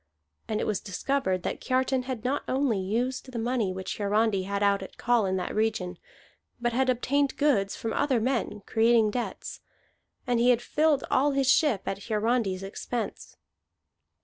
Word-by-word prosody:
And 215 -1 -1
it - - -1
was 210 -3 0
discovered 190 -2 -1
that - - -3
Kiartan 260 0 0
had 250 -4 -4
not 270 +3 0
only 260 -6 +1
used 245 +7 -2
the 245 - -5
money 230 -3 0
which 185 +2 -5
Hiarandi 205 -1 +1
had 200 0 -1
out 200 -1 +3
at 190 - -10
call 240 -4 +2
in 190 - 0
that 180 - -3
region, 210 -5 -1 0.6
but 240 0 -1
had 260 +2 +2
obtained 275 +3 +1
goods 205 -10 +2
from 225 - -4
other 280 -4 +1
men 230 -4 -1
creating 225 -1 +3
debts. 240 +2 -4 0.7
And 245 -2 +1
he 240 +1 +4
had 245 -2 +5
filled 300 +2 +1
all 285 +2 +3
his 270 -1 +3
ship 275 - +3
at 195 +1 -4
Hiarandi's 215 -3 0
expense. 215 +3 -5
235 Hz, 170 wpm, -27 LUFS, 200-260 Hz, 0.7 s, had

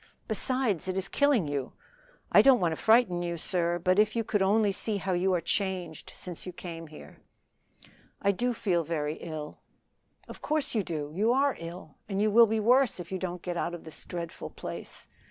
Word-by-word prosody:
Besides, 225 -4 +1
it 185 0 -2
is 190 0 0
killing 275 - +2
you! 140 -2 -3 0.6
I - - +8
don't 270 -2 +6
want 175 -3 +1
to - - -1
frighten 220 -3 +3
you, 170 -1 -3
sir; 175 0 0
but 185 +3 +2
if 215 +1 +3
you 230 - +1
could 210 -2 0
only 205 +2 +3
see 205 +2 -1
how 190 -1 -2
you 180 +2 +1
are - - +1
changed 180 -3 -3
since 175 -3 -7
you 180 - -6
came 165 -2 -8
here 150 0 -13 0.5
" - - -24 0.2
"I 200 - +4
do 245 +6 0
feel 185 -7 0
very 155 -1 -2
ill." 155 -3 -7 0.7
"Of - - -11
course 305 -1 -1
you 220 - +2
do; 150 -5 -4
you 210 +7 +2
are 275 +1 +2
ill, 170 -2 -9
and 195 -1 -1
you 210 +1 +2
will 230 +2 +7
be 220 +1 0
worse 245 0 +3
if 175 0 -8
you 190 - -2
don't 180 -1 -5
get 175 -1 -3
out 175 +1 -2
of 170 - -11
this 160 - -9
dreadful 170 -1 -6
place. - - -8
185 Hz, 210 wpm, -29 LUFS, 170-215 Hz, 0.7 s, I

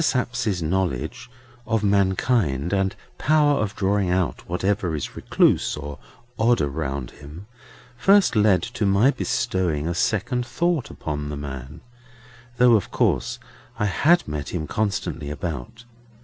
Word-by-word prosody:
Sapsea's 120 - 0
knowledge 80 - -2 0.4
of 110 -1 0
mankind 95 - +1
and 95 -1 +1 0.2
power 150 -1 +3
of 105 -1 -2
drawing 100 -1 +1
out 90 -1 -1
whatever 90 -1 0
is 75 - -5
recluse - - +2
or 75 -1 -7 0.4
odd 120 +2 +3
around 70 -3 -3
him, 75 +7 -11 0.5
first 195 +3 +4
led 105 -3 +4
to 115 -3 -2
my 100 +8 +4
bestowing 85 - -1
a 85 - -1
second 110 +7 0
thought 160 +3 -1
upon 75 -1 -5
the 75 - -4
man: 70 +2 -7 0.8
though 125 -1 +6
of 105 -4 +2
course - - 0 0.4
I 105 - 0
had 155 - +3
met 75 -2 -4
him 80 -3 -2
constantly 85 -7 -2
about. 80 - -6
95 Hz, 135 wpm, -23 LUFS, 75-115 Hz, 0.8 s, though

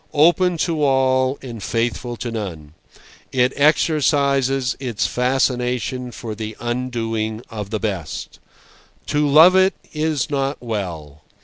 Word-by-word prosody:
Open 175 +3 +4
to 160 -2 0
all 130 -1 +2
and 120 -4 -7
faithful 115 +3 -2
to 120 0 -4
none, 85 -9 -6 0.6
it 125 0 +2
exercises 140 -3 +2
its 125 -6 -2
fascination 125 -1 0
for 115 -2 -6
the 110 0 -6
undoing 115 -2 -3
of 105 -3 -5
the 110 0 -2
best. 95 -8 -4 0.7
To 150 0 +1
love 160 +6 +7
it 190 0 +4 0.2
is 155 -1 -1
not 140 0 -1
well. 85 - -5
125 Hz, 120 wpm, -20 LUFS, 110-140 Hz, 0.7 s, love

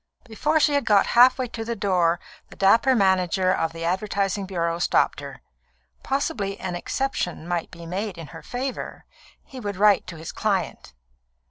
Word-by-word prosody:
"] - - -43
Before 295 +7 0
she 295 -1 +3
had 285 - +2
got 210 -3 +4
half 250 +2 +7
way 255 -1 -2
to 225 -1 -5
the 235 +1 -3
door 180 -4 +1 0.3
the - - -13
dapper 230 +7 +4
manager 190 -2 +2
of 165 - -1
the 165 0 -6
advertising 195 +2 -1
bureau 170 -2 -2
stopped - - +2
her. - - -10 0.6
Possibly 245 -8 -2
an 185 -1 -4
exception 175 - -3
might 175 -2 -2
be 170 0 -11
made 190 +2 -4
in 165 - -7
her 165 - -9
favour; 255 +1 -5 0.4
he 265 - -11
would 205 -4 -5
write 205 -1 +4
to 175 - -7
his 160 +1 -7
client. - - -2
195 Hz, 175 wpm, -24 LUFS, 175-235 Hz, 0.6 s, half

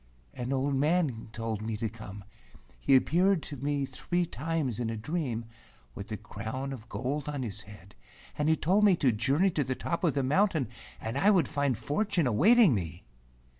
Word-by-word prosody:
"An 125 +1 -4
old 135 +1 0
man 140 -5 +1
told 115 -2 -3
me 110 0 -3
to 115 +1 -1
come. 105 -3 -9 0.6
He 135 - +4
appeared 170 +7 +3
to 145 - -7
me 140 +1 -1
three 175 +5 -1
times 155 -7 -2
in 120 -2 -1
a 115 - -3
dream, 125 -2 -3 0.5
with 100 - -8
a 105 - -2
crown 110 +6 -5
of 115 -3 -10
gold 140 +3 -3
on 145 -3 -3
his 110 -2 -4
head, 100 -1 -14 0.4
and 150 +1 0
he 160 - +5
told 190 +7 +2
me 200 -3 +6
to 135 -6 +2
journey 140 - +2
to 150 - 0
the 130 0 -2
top 170 +7 -3
of 160 -5 +2
the 140 - +1
mountain 155 - +2 0.3
and 115 +5 -3
I 200 - +5
would 185 -8 +4
find 140 -5 0
fortune 195 +1 0
awaiting 185 - +5
me." 85 -4 -4
135 Hz, 190 wpm, -29 LUFS, 115-160 Hz, 0.6 s, me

